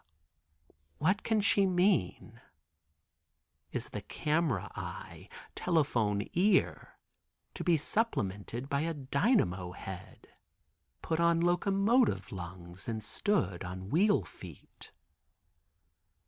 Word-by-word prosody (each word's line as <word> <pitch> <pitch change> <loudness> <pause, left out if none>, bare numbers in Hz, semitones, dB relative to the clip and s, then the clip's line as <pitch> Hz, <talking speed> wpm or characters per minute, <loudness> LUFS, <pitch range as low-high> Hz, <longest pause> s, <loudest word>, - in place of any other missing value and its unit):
What 185 +7 +1
can 220 -2 +1
she 200 -1 +4
mean? 175 - +1 1.3
Is - - -4
the - - -5
camera 150 - -1
eye, - - -8 0.2
telephone 120 - +1
ear 190 +2 +2 0.6
to - - -5
be 170 -3 +4
supplemented 120 - -2
by 140 0 0
a 165 +1 -2
dynamo 130 - +1
head, 95 0 -9 0.8
put 160 0 -1
on 170 0 +4
locomotive 195 +7 +2
lungs 85 0 -8
and 110 -2 -3
stood 100 - -1
on 95 +2 -7
wheel 190 - +4
feet? 80 - -13
150 Hz, 95 wpm, -31 LUFS, -, 1.3 s, she